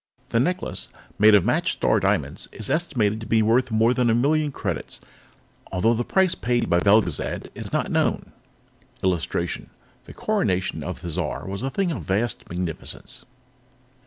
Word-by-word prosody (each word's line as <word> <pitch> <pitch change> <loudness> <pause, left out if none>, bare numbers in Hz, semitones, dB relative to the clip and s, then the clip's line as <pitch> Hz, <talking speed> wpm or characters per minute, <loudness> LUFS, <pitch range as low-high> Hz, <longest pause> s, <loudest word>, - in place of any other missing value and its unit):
The 115 - +2
necklace, 180 +9 -1 0.3
made 105 0 +7
of 100 - +4
matched - - +1
Star - - +2
Diamonds, - - -1
is 110 - -5
estimated 115 -10 0
to 110 - -7
be 110 -1 +3
worth 120 +4 +3
more 115 +2 +3
than 125 -2 +2
a 115 - +4
million 150 +4 +2
credits, - - -4 0.7
although 105 +5 +2
the 120 +1 0
price 190 +6 +2
paid 120 -7 0
by 85 - +5
Belgezad 100 -4 +1
is - - -7
not - - -1
known. - - 0 0.7
[Illustration: 90 -4 -1 0.4
The - - -11
coronation 100 - 0
on - - -4
Thizar 85 +1 -4
was 95 +2 -4
a 135 - -1
thing 185 +4 0
of 140 - -4
vast 105 +4 -1
magnificence. 85 -2 -5
115 Hz, 160 wpm, -24 LUFS, 95-130 Hz, 0.7 s, made